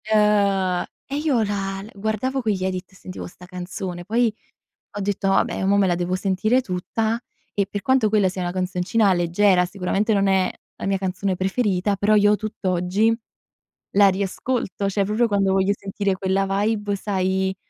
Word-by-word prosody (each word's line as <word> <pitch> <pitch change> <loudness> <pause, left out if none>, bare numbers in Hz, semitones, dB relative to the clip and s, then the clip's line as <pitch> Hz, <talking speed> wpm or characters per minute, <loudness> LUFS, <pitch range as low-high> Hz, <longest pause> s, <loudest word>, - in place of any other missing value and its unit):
Ehm, 200 -4 +2 0.2
e 275 - -5
io 290 -6 +1
la 195 -2 -3
l 210 - -11
guardavo 220 +6 -2
quegli 205 -5 -1
Edits 185 0 -4
e - - -19
sentivo 185 0 -8
sta' 180 0 -14
canzone, 180 0 -6
poi 230 +2 +2 0.6
ho - - -2
detto: 200 0 -1
"Vabbè 195 - +1
mo' 200 +1 +3
me 200 -1 +4
la 175 - +2
devo 175 +1 -1
sentire 195 +6 +1
tutta" 220 +3 -2 0.3
e 200 -1 0
per 200 0 -5
quanto 260 -4 +3
quella 205 -2 +3
sia 185 0 -5
una 175 0 -2
canzoncina 185 +3 +1
leggera, 180 +2 +3
sicuramente 195 +4 -1
non 200 0 +2
è 190 -1 +2 0.3
la - - -5
mia 195 0 +1
canzone 190 0 -2
preferita, 195 0 0
però 205 +2 +3
io 205 0 +5
tutt'oggi 205 +1 0 0.8
la 200 0 +6
riascolto, 200 +1 -2
cioè 200 0 0
proprio 215 +4 +1
quando 200 -2 +2
voglio 195 +1 +2
sentire 200 0 -2
quella 190 +1 0
vibe, 205 +1 0
sai, 190 -1 -1
195 Hz, 170 wpm, -23 LUFS, 185-210 Hz, 0.8 s, la